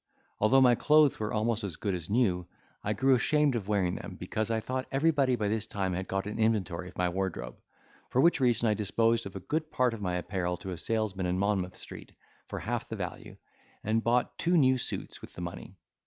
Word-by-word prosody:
Although 130 +6 +5
my 125 -2 +6
clothes 150 +3 +4
were 105 -1 -2
almost 110 +1 0
as 95 -6 -4
good 100 -3 -2
as 85 -1 -5
new, 100 -6 +1 0.4
I 105 - 0
grew 135 +5 +3
ashamed 145 +3 +3
of 110 -5 -3
wearing 95 -4 +1
them, - - -8
because 110 +1 -2
I 115 -1 +1
thought 130 +3 -3
everybody 140 -2 +3
by 105 -3 -1
this 110 +1 -1
time 95 -3 -2
had 95 +1 -3
got 95 0 -2
an 105 +2 -5
inventory 95 -6 0
of - - -16
my 90 - +2
wardrobe. 90 -9 -3 0.5
For 125 - +1
which 170 +4 +5
reason 120 -2 +3
I 105 - +4
disposed 115 +2 +1
of 100 - -11
a - - -4
good 155 - -2
part 125 -2 +2
of 110 - -7
my 90 -2 -1
apparel 90 -1 -2
to 95 - -7
a 90 - -5
salesman 105 -3 -1
in 90 +1 0
Monmouth 95 -2 0
Street - - -10 0.3
for - - -5
half - - -3
the - - -4
value, - - -6 0.5
and 110 +1 +1
bought 120 +1 +1
two 175 +1 +3
new 130 -3 +4
suits - - -5
with - - -11
the - - -8
money. 85 0 -7
110 Hz, 220 wpm, -29 LUFS, 95-125 Hz, 0.5 s, my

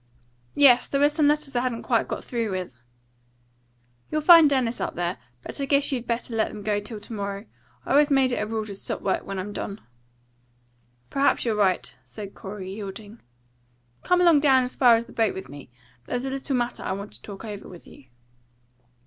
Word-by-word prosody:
"Yes; 265 -4 +6
there 275 - -1
were 290 +1 +5
some 300 0 +2
letters 295 -2 0
I - - +3
hadn't 245 -2 -2
quite - - +1
got - - -5
through 235 -4 -2
with." 180 -11 -5 1.3
"You'll 310 - -1
find 330 -1 +8
Dennis 255 -4 0
up - - -3
there. 175 +1 -2 0.2
But - - -7
I - - 0
guess 280 +1 +2
you 260 -3 -1
better 235 0 -3
let 220 - +2
them 210 -1 -9
go 210 -1 0
till 210 +1 -7
to 225 - -10
morrow. 200 0 -4 0.4
I - - -4
always 290 +1 +5
make 270 -2 +3
it 245 - -1
a 210 - -2
rule 220 -1 -3
to 205 - -7
stop 195 - -6
work 195 - 0
when 195 - -4
I'm 195 +2 -5
done." 200 +1 -5 1.3
"Perhaps 275 -2 +2
you're 230 - +1
right," 195 -4 +1
said 205 -2 -9
Corey, 195 -1 -7
yielding. 205 +2 -8 0.8
"Come 360 0 +2
along 340 -4 +6
down 265 -3 +4
as 250 - -4
far 245 -3 +6
as 230 +1 -1
the - - -15
boat 225 -3 +1
with 190 - -7
me. 145 -2 -11 0.4
There's 245 +1 -2
a 265 - -3
little 275 0 -2
matter 240 -1 -2
I - - -2
want 200 +2 -6
to - - -12
talk 200 +1 -9
over 210 -2 -7
with 175 -2 -13
you." 135 - -16
230 Hz, 210 wpm, -25 LUFS, 200-275 Hz, 1.3 s, find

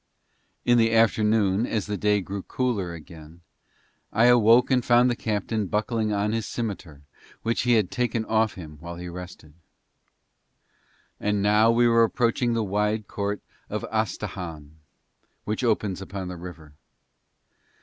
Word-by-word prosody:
In 120 0 +4
the 115 0 +3
afternoon, 110 -1 +3
as 110 -4 -2
the 105 - -3
day 105 +1 +1
grew 95 +1 -5
cooler 110 -6 -2
again, 80 +1 -13 0.7
I 115 +3 +3
awoke 120 +1 +5
and 125 -2 +3
found 120 +1 +4
the - - -1
captain 110 -1 -2
buckling 110 +2 -1
on 105 +1 0
his 115 -2 -2
scimitar, 95 -11 -5 0.4
which 115 +1 0
he - - +6
had 110 -5 +2
taken 115 -2 -1
off 110 0 +1
him 75 -5 -10
while 85 +2 -8
he 90 +1 -7
rested. 90 -3 -10 1.7
And 105 -1 0
now 105 +2 +4
we 120 +1 +4
were 115 0 +5
approaching 120 +1 +1
the 115 - 0
wide 105 +1 -1
court 100 0 -3 0.3
of - - -3
Astahahn, 90 -8 -4 0.7
which 105 +4 -3
opens 105 -5 0
upon 95 -1 -6
the 90 - -6
river. 85 -4 -10
105 Hz, 145 wpm, -25 LUFS, 95-115 Hz, 1.7 s, he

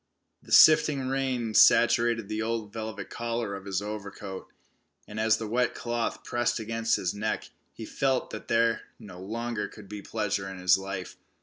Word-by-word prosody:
The - - -16
sifting 145 -4 +6
rain 130 -4 -1
saturated 115 -1 +5
the 110 +1 -3
old 110 -2 -3
velvet 110 -1 -6
collar 115 -3 -3
of 100 0 -7
his 100 0 -2
overcoat, 100 -2 -7 0.6
and 105 +1 -6
as 110 0 +3
the 110 - -5
wet 125 +3 0
cloth 120 -1 -3
pressed 120 0 0
against 115 +1 0
his 90 - -2
neck, 105 +1 -3 0.2
he 110 - -9
felt 135 +3 -1
that 110 - -8
there 115 0 +2 0.2
no 90 -3 -11
longer 110 +1 -3
could 105 -2 -13
be 105 +1 -7
pleasure 100 -2 -2
in 95 -1 -9
life. 95 -1 -6
110 Hz, 165 wpm, -28 LUFS, 100-115 Hz, 0.6 s, sifting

